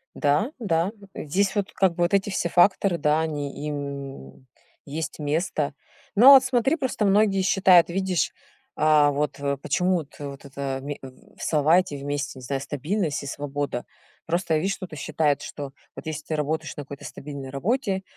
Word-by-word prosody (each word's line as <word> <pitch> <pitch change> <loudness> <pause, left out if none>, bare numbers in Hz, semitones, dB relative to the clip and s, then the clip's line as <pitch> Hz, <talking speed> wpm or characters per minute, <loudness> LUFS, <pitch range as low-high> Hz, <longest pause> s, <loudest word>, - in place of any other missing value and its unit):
Да, 150 - +1
да. 175 -3 +1 0.2
Здесь 190 +6 0
вот 205 -1 -1
как 190 -3 +2
бы 175 - +1
вот 175 - 0
эти 200 +1 +2
все 185 -3 -1
факторы, 185 +1 +4
да, 150 0 +2
они 150 -2 -4
им 140 - -6 0.4
есть 155 +2 -4
место. 150 -1 -1 0.4
Ну, 230 +6 +7
а - - +12
вот 265 -1 +8
смотри, 260 +2 +2
просто 260 -8 -1
многие 200 -1 +3
считают, 185 -2 +5
видишь, 185 0 0 0.4
а 150 -1 +4
вот, 145 +1 -2
э, 140 0 -1
почему 180 +6 +1
вот 150 -3 -7
вот 140 -1 -7
это 140 -1 -4
в - - -13
ме 145 0 -4
в, - - -9
э, - - -12 0.3
салате 160 +1 +2
вместе, 140 -1 -4
не - - -12
знаю, 135 +2 -2
стабильность 150 +3 -2
и - - -7
свобода. 140 -2 -3 0.4
Просто 170 0 0
я - - +2
вижу, 195 +4 -1
кто-то 180 -5 -8
что - - -6
считает, 150 -2 +1
что 140 -2 -7 0.2
вот - - -9
если 155 -1 -4
ты 160 - -2
работаешь 155 +1 -2
на 145 - -4
какой-то 140 0 -10
стабильной 140 -2 -7
работе, 195 - -1
155 Hz, 185 wpm, -25 LUFS, 145-190 Hz, 0.4 s, а